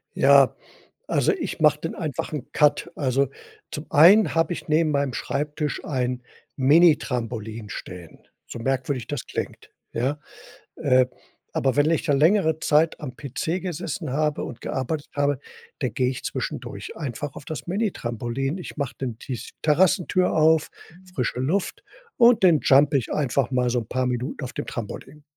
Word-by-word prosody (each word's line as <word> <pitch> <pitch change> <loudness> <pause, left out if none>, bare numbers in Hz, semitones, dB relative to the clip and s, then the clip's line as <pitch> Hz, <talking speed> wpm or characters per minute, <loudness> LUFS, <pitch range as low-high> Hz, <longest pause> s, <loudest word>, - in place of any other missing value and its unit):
Ja, - - +5 0.5
also - - +2
ich 360 - -4
mach 150 -2 +5
dann 165 +2 -5
einfach 150 -6 -4
'n 150 - -5
Cut. 150 -1 +2
Also, 135 -1 +1 0.4
zum 150 - -6
einen 175 +8 +6
habe 165 +2 +2
ich - - -8
neben 155 0 +2
meinem 140 -2 0
Schreibtisch 150 +2 -3
ein 125 -3 -2 0.4
Minitrampolin 125 -8 +2
stehen, 90 -4 -9 0.3
so - - -7
merkwürdig 130 0 -2
das 145 -4 -4
klingt, - - -6 0.2
ja? 135 +6 -1 0.6
Äh, 130 -4 +3 0.5
aber 135 -1 +1
wenn 145 +2 +4
ich 165 0 +1
da 155 - +2
längere 160 +2 +3
Zeit 155 +2 +2
am 130 -4 -7
PC 155 +6 -3
gesessen 170 -4 -4
habe 150 +1 0
und 120 - -8
gearbeitet 145 +3 -3
habe, 145 -1 +1 0.4
da - - 0
gehe 125 0 0
ich 130 - -6
zwischendurch - - -5
einfach 145 -1 -5
auf 140 - -11
das 155 - -6
Minitrampolin. 135 - -2
Ich 180 - -8
mach 140 -4 -2
dann 125 -4 -5
die 130 - -7
s 120 - -8
Terrassentür 180 +3 +3
auf, 160 0 +4 0.5
frische 125 -3 -1
Luft 175 +9 -1 0.3
und 235 -4 +5
dann 165 -5 +6
jump 140 +2 +5
ich 130 -5 0
einfach 140 -2 0
mal 125 -2 +1
so 125 - +1
'n 110 - -8
paar 130 0 0
Minuten 125 +4 -3
auf 125 - -6
dem - - -5
Trampolin. 135 +6 -7
145 Hz, 160 wpm, -24 LUFS, 125-160 Hz, 0.6 s, einen